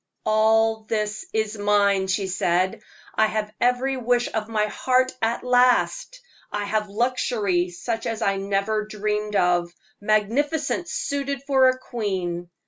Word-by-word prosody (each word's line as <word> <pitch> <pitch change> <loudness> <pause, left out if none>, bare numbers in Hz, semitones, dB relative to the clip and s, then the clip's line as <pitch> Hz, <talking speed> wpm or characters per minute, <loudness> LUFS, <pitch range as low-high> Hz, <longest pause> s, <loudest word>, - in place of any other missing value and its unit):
"All 220 0 +3
this 215 -1 -2
is 220 -1 -2
mine!" 200 -2 +2
she 190 +1 0
said. 185 0 0 0.3
"I 220 - +3
have 215 -1 -3
every 250 +2 +1
wish 245 0 +1
of 220 0 -2
my 215 -2 +1
heart 255 +4 +1
at 225 +1 0
last! 250 - +2 0.3
I 205 0 -2
have 210 0 -1
luxury 210 -5 0
such 225 +6 -4
as 225 0 -2
I 195 -1 +1
never 200 +2 -1
dreamed 210 0 -3
of 175 -2 +2 0.3
magnificence 275 - 0
suited 280 -1 -2
for 265 -2 +4
a 255 - 0
queen! 185 -8 -4
215 Hz, 135 wpm, -23 LUFS, 200-245 Hz, 0.3 s, for